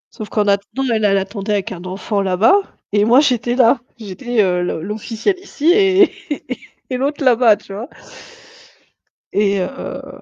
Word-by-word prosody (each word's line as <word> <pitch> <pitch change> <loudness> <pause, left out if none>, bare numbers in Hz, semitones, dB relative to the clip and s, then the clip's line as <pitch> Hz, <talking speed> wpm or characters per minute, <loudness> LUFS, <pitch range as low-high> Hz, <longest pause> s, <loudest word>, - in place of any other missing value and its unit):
Sauf 215 - -7
qu'en 210 -2 0
attendant, 200 +6 0
elle, 215 -1 +1
elle 195 -1 +3
attendait 200 +1 -3
avec 205 +2 -2
un 175 -2 -7
enfant 200 +2 -2
là-bas 190 - +3 0.4
et 205 0 +3
moi 235 +5 +5
j'étais 245 -4 +1
là, 250 +1 +4 0.2
j'étais, 225 +2 -1
heu, 180 -2 +1
le 175 -2 -3
l'officielle 220 - -2
ici 335 -4 0
et 390 -2 +4 0.8
et 255 - -1
l'autre 285 +3 -2
là-bas, 240 -4 +5
tu 195 - -12
vois. 225 +8 -6 1.5
Et 200 -1 +2
heu 270 +9 -7
220 Hz, 160 wpm, -18 LUFS, 200-255 Hz, 1.5 s, moi